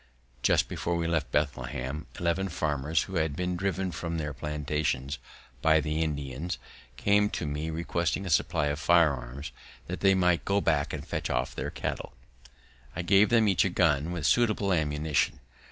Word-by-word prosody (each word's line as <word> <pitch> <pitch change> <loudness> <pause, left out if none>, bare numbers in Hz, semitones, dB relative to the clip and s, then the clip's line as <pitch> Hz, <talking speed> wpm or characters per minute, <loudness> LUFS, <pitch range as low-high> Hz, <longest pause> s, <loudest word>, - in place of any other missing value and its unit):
Just - - +3
before 85 - -2
we 85 -1 -1
left 80 -1 0
Bethlehem, 70 -1 -2
eleven 90 +3 0
farmers, 75 -2 0
who 95 -2 -4
had 80 -3 0
been 90 +2 -1
driven 95 0 -1
from 85 -1 -4
their 75 -2 -3
plantations 75 -1 -2 0.4
by 80 0 +5
the 75 +1 -1
Indians, 75 +1 -3 0.4
came 105 0 +3
to - - -3
me 75 +2 -3
requesting 85 +3 -1
a 90 - -3
supply 75 - +2
of 75 +1 -2
firearms, 75 -4 +2 0.3
that - - -5
they 95 -1 +4
might 90 -2 +2
go 100 +1 +2
back 70 -7 +1
and - - -5
fetch - - -3
off - - -1
their - - -3
cattle. - - -4 0.8
I 90 - -2
gave 100 +4 +5
them 115 -2 +4
each 95 -3 +4
a 95 - +1
gun 80 -3 +2
with 85 -4 -3
suitable 105 -1 +3
ammunition. 75 -3 0
80 Hz, 170 wpm, -28 LUFS, 75-90 Hz, 0.8 s, by